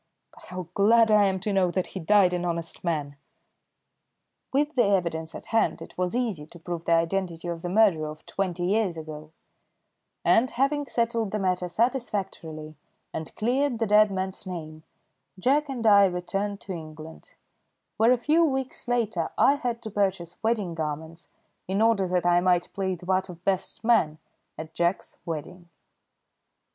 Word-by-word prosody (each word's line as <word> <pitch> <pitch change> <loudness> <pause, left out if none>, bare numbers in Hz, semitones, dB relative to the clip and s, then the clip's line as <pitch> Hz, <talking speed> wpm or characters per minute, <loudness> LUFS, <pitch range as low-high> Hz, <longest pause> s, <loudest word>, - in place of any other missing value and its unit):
But - - -16
how 180 -2 -6
glad 220 +3 +5
I 210 -1 +6
am 190 -1 0
to 205 +1 -1
know 190 -2 +3
that 185 +1 -2
he 190 - -4
died 185 +1 +4
an 175 0 -1
honest 170 -1 -4
man!" 150 -5 -2 1.3
With 295 +3 +1
the 245 -5 +3
evidence 170 -5 0
at - - -9
hand 225 - +2
it - - -11
was 180 +3 -1
easy 215 -12 -2
to 170 - -14
prove 170 0 -6
the 170 - +3
identity 170 0 0
of 170 -1 -4
the 175 - -4
murderer 180 -6 +3
of 155 +1 -11
twenty 180 -3 -2
years 195 -3 +1
ago, 155 -1 -8 0.9
and, 245 +3 +4
having 280 +3 0
settled 230 -3 0
the 215 - -2
matter 180 -2 0
satisfactorily 195 - -2 0.4
and 160 -1 -6
cleared 250 +3 +1
the 225 - 0
dead 210 0 +5
man's 190 0 -4
name, 155 -3 -7 0.6
Jack 275 +8 +2
and 245 -4 -4
I 200 -2 +7
returned 195 +3 -2
to 195 - -6
England, 155 -1 -10 0.6
where 225 +2 +5
a 250 - +4
few 305 +7 +3
weeks 265 -4 -2
later 220 -8 0
I 275 - +5
had 245 -5 -3
to 220 - -6
purchase 190 -4 -1
wedding 220 -6 0
garments 160 +1 -5 0.4
in 190 +2 0
order 220 -4 +3
that 180 -1 0
I 175 0 +5
might 180 -1 +1
play 190 -1 -1
the 175 - -13
part 185 0 0
of 175 0 -11
best 195 +2 -1
man 220 -10 +3 0.4
at 160 0 -8
Jack's 175 +2 -1
wedding. 170 +2 -6
190 Hz, 170 wpm, -26 LUFS, 170-225 Hz, 1.3 s, I